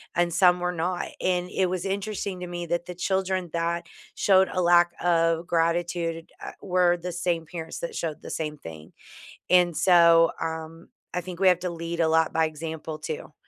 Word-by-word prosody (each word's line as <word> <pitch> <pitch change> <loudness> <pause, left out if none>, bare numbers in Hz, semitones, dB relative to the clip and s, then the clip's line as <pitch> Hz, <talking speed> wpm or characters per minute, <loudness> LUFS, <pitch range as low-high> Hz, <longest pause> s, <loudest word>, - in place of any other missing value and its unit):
and 175 0 +1
some 180 +1 +4
were 180 0 -1
not, 175 +1 -2
and 180 -1 0
it 190 - +1
was 180 0 -3
interesting 195 -1 -3
to 180 - -5
me 175 0 -5
that 175 +1 -1
the 180 - -7
children 190 -1 -1
that 170 0 -2 0.3
showed 190 -1 +4
a 185 - -1
lack 175 0 +4
of 165 -1 +2
gratitude, 170 0 -1
uh, - - -7
were 180 -2 +2
the 180 +1 -5
same 175 -1 -1
parents 160 0 -7
that 170 - -5
showed 160 -3 -4
the - - -7
same 150 -2 -4
thing, 80 - -11 0.6
and 175 -2 +4
so, 170 -2 +5
um, 160 +1 -5 0.3
I 180 - 0
think 180 -1 -8
we 190 - +5
have 180 -2 +4
to 180 0 -3
lead 170 0 -5
a 165 - +3
lot 160 0 +2
by 160 0 +2
example 155 0 -6
too 155 0 -6
170 Hz, 190 wpm, -26 LUFS, 165-180 Hz, 0.6 s, so